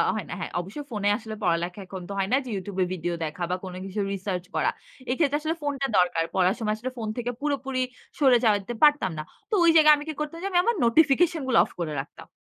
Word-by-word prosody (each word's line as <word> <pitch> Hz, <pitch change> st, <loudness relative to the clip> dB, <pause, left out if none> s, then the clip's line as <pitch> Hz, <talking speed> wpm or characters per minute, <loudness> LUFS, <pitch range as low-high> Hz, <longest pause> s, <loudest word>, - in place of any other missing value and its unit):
হয় -, -, -3 dB
না। -, -, -4 dB
হ্যাঁ, -, -, -5 dB
অবশ্যই 205 Hz, +12 st, -6 dB
ফোনে 205 Hz, -2 st, 0 dB
আসলে 220 Hz, -2 st, -7 dB
পড়ালেখা 175 Hz, +2 st, 0 dB
এখন 190 Hz, 0 st, -7 dB
তো -, -, -4 dB
হয় 195 Hz, +1 st, 0 dB
না 265 Hz, -, +6 dB
যে -, -, -7 dB
YouTube 190 Hz, 0 st, -6 dB
ভিডিও 175 Hz, -1 st, -3 dB
দেখা 155 Hz, +3 st, -5 dB
বা -, -, +2 dB
কোনো 180 Hz, -1 st, -7 dB
কিছু 195 Hz, +2 st, -5 dB
রিসার্চ 190 Hz, -2 st, -3 dB
করা। -, -, +2 dB, 0.4 s
এই 255 Hz, -, +1 dB
ক্ষেত্রে 290 Hz, -2 st, +3 dB
আসলে 320 Hz, +2 st, -1 dB
ফোনটা 275 Hz, -1 st, -1 dB
দরকার। 175 Hz, -2 st, +3 dB
পড়ার 185 Hz, +1 st, +3 dB
সময় 215 Hz, -1 st, 0 dB
আসলে 250 Hz, +4 st, -5 dB
ফোন 225 Hz, -2 st, -4 dB
থেকে 245 Hz, 0 st, -2 dB
পুরোপুরি 270 Hz, -3 st, -1 dB, 0.4 s
সরে 265 Hz, -4 st, +6 dB
যেতে 205 Hz, +1 st, +2 dB
পারতাম 295 Hz, -9 st, +5 dB
না। 155 Hz, -, -3 dB, 0.3 s
তো -, -, -6 dB
ওই 330 Hz, -, +7 dB
জায়গায় 305 Hz, -1 st, +8 dB
আমি 290 Hz, -, -6 dB
কি -, -, -2 dB
করতাম 300 Hz, +2 st, -4 dB
যে, -, -, 0 dB
আমি 355 Hz, -, +4 dB
আমার 470 Hz, -, +2 dB
নোটিফিকেশন 315 Hz, +6 st, +4 dB
গুলো 250 Hz, -3 st, +3 dB
অফ -, -, -15 dB
করে 160 Hz, -3 st, -2 dB
রাখতাম। 145 Hz, -, -13 dB
225 Hz, 235 wpm, -26 LUFS, 185-290 Hz, 0.4 s, জায়গায়